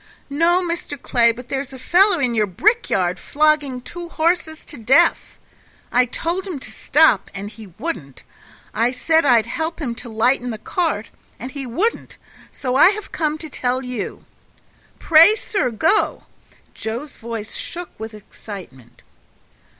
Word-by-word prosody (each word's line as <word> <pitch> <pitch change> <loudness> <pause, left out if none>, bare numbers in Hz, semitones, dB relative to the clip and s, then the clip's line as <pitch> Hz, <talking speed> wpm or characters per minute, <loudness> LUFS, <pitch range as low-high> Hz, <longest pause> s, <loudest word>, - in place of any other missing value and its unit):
"No, 340 +5 +3
Mr. 335 -4 -4
Clay, 235 -2 +3
but 245 +2 -11
there's 270 0 -3
a - - -8
fellow 365 +8 +4
in 250 -5 +1
your 215 -2 +2
brick 430 - +1
yard 180 -1 0
flogging 295 -4 +1
two 345 +6 -8
horses 325 -1 -1
to - - -8
death. 245 +5 +3 0.5
I 250 +1 +4
told 345 +9 -3
him 355 -6 -4
to 260 - -10
stop, 285 -9 +3
and 200 +1 -6
he 220 -1 -11
wouldn't; 165 - -5 0.5
I 230 +2 +2
said 320 +3 +2
I'd 235 -4 +5
help 320 +1 -3
him 260 -7 -2
to 240 - -9
lighten 245 +3 +1
the 225 - -4
cart, 310 - -2 0.3
and 255 +2 -7
he 275 -2 -6
wouldn't; 375 - -1 0.3
so 255 -2 -3
I 295 +7 +8
have 420 0 -5
come 310 -1 -1
to 315 - -8
tell 255 -2 -2
you. 250 -5 -5 0.7
Pray, 330 +6 +6
sir, 400 - -1
go." 315 - +1 0.5
Joe's 235 +7 -5
voice 225 -2 -6
shook 350 0 -6
with 220 0 -7
excitement. 180 - -12
265 Hz, 155 wpm, -20 LUFS, 225-330 Hz, 0.7 s, I